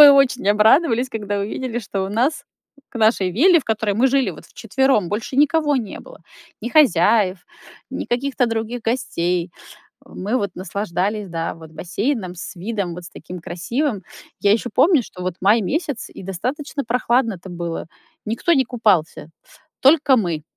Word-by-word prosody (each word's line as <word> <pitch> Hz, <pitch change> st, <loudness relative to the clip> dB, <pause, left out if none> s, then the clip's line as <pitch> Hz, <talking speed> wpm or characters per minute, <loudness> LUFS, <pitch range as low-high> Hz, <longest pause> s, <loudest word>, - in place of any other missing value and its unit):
мы 290 Hz, -1 st, +12 dB
очень 260 Hz, -5 st, +3 dB
обрадовались, 230 Hz, +4 st, +4 dB
когда 205 Hz, -3 st, -3 dB
увидели, 230 Hz, +4 st, -3 dB
что 195 Hz, -2 st, -3 dB
у 190 Hz, -, -3 dB
нас 265 Hz, +8 st, 0 dB, 0.5 s
к -, -, -27 dB
нашей 215 Hz, -4 st, +3 dB
вилле, 335 Hz, -, +5 dB
в -, -, -16 dB
которой 215 Hz, -2 st, -1 dB
мы 235 Hz, +6 st, +3 dB
жили 265 Hz, -5 st, +2 dB
вот 160 Hz, -, -12 dB
вчетвером, 225 Hz, -3 st, 0 dB
больше 220 Hz, +6 st, -4 dB
никого 295 Hz, 0 st, +3 dB
не 225 Hz, -6 st, -4 dB
было: -, -, -14 dB, 0.4 s
ни 235 Hz, -, -4 dB
хозяев, 210 Hz, -, +4 dB, 0.5 s
ни -, -, -4 dB
каких-то 250 Hz, +1 st, 0 dB
других 225 Hz, +1 st, -3 dB
гостей. 180 Hz, -7 st, -1 dB, 0.5 s
Мы 225 Hz, -2 st, -3 dB
вот 200 Hz, -5 st, -1 dB
наслаждались 200 Hz, +2 st, -2 dB
да, 165 Hz, -1 st, -3 dB
вот, 160 Hz, -1 st, -13 dB
бассейном 195 Hz, -, -2 dB
с 185 Hz, +2 st, -8 dB
видом 195 Hz, -1 st, -3 dB
вот 175 Hz, 0 st, -9 dB
с 175 Hz, -, -10 dB
таким 180 Hz, -, -9 dB
красивым. 210 Hz, -, -2 dB, 0.4 s
Я 200 Hz, -, +4 dB
ещё 230 Hz, +3 st, 0 dB
помню, 320 Hz, -6 st, +5 dB
что 180 Hz, -3 st, -10 dB
вот 180 Hz, -1 st, -2 dB
май 210 Hz, +4 st, +4 dB
месяц, 290 Hz, -, -2 dB
и -, -, -10 dB
достаточно 265 Hz, -, -4 dB
прохладно-то 230 Hz, -5 st, 0 dB
было. 170 Hz, -2 st, -5 dB, 0.4 s
Никто 235 Hz, +11 st, 0 dB
не 270 Hz, -5 st, +4 dB
купался. 200 Hz, -, 0 dB, 0.5 s
Только 275 Hz, -1 st, +5 dB
мы, 170 Hz, -9 st, -1 dB
220 Hz, 160 wpm, -21 LUFS, 185-260 Hz, 0.5 s, мы